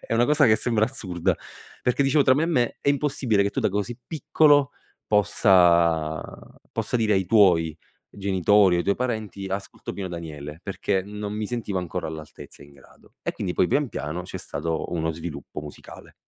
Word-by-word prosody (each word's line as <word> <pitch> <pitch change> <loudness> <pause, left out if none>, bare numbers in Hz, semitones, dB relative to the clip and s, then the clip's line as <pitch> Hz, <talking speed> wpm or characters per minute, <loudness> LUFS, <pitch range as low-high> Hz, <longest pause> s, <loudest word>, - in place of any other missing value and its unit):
è - - -7
una 120 +2 +3
cosa 150 0 +4
che 110 -1 +5
sembra 110 -3 +1
assurda 95 -9 -2 0.5
perché 125 +3 +2
dicevo 140 +2 +3
tra 130 -1 +5
me 150 - +1
e - - +1
me: 125 -8 +1
"È - - 0
impossibile 135 -7 +1
che 100 - 0
tu - - -2
da - - +2
così 105 +4 -2
piccolo 150 -2 +3 0.3
possa 85 -6 +3 0.5
possa - - -1
dire 110 -3 +1
ai 95 -1 +1
tuoi 85 -8 +4 0.3
genitori 100 0 +3
o 85 - +2
ai - - -1
tuoi 100 - +2
parenti: 110 -5 -3
"Ascolto 95 +1 -5
Pino 95 -2 -5
Daniele", 80 -3 -7
perché 100 0 -1
non 105 +1 -6
mi 105 0 -3
sentivo 110 -5 -3
ancora 90 -1 -4
all'altezza 80 -1 -10
e - - -14
in 70 - -19
grado. 70 - -21
E - - -2
quindi 90 - -4
poi - - +3
pian 145 +5 +1
piano 75 -3 -4
c'è 90 - -8
stato 80 +3 -4
uno 80 -1 -1
sviluppo 80 -3 -7
musicale. 75 -1 -12
100 Hz, 190 wpm, -24 LUFS, 85-120 Hz, 0.5 s, che